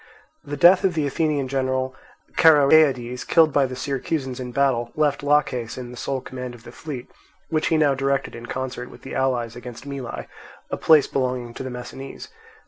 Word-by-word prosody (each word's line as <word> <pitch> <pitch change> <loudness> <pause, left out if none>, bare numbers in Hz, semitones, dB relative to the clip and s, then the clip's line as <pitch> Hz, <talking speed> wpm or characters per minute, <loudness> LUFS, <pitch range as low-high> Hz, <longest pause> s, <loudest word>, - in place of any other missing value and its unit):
The 145 -1 -5
death 175 +5 +6
of 185 -3 +2
the 155 -2 +1
Athenian 145 -1 0
general 130 0 -1 0.4
Charoeades, 140 -5 +5
killed 160 -3 +4
by 140 -2 +3
the 130 - -6
Syracusans 135 0 -3
in 125 -1 -5
battle, 120 -3 +1
left 150 -2 +1
Laches 140 -5 +1
in 125 -1 -7
the - - -9
sole 130 +2 -3
command 125 -1 -7
of 115 - -16
the - - -11
fleet, 140 -6 -7 0.4
which 155 -1 0
he 160 - +2
now 150 -3 +4
directed 135 0 -1
in 120 +1 -9
concert 125 -1 -4
with - - -15
the 135 - -8
allies 120 -3 0
against 120 +1 -9
Mylae, 140 -3 -5 0.5
a - - -1
place 155 -3 +5
belonging 125 -3 -2
to - - -8
the 130 - -4
Messinese. 125 +2 -8
135 Hz, 185 wpm, -23 LUFS, 125-145 Hz, 0.5 s, death